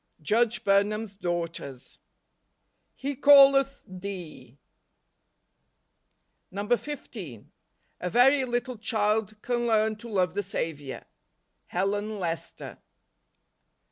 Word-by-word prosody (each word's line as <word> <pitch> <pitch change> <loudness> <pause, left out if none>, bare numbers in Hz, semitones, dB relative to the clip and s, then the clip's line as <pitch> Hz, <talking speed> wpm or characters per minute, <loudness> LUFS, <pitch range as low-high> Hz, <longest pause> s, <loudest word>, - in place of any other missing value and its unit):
Judge 230 +4 +1
Burnham's 205 +1 +1
Daughters. 170 -8 -5 0.5
" - - -49
He 280 +1 -1
calleth 275 0 +6
thee." 180 -8 -8 1.9
NOVEMBER. 205 +5 -1
129 210 - -8
15. - - -30 0.5
A 180 - -3
very 265 +6 +5
little 245 0 -2
child 215 -1 0
can 240 -1 -1
learn 220 -1 +2
to 235 +3 -10
love 185 -5 +1
the 205 - -1
Saviour. 160 -8 -4 0.6
Helen 205 +3 -1
Lester. 170 -2 -5
210 Hz, 95 wpm, -27 LUFS, 180-240 Hz, 1.9 s, calleth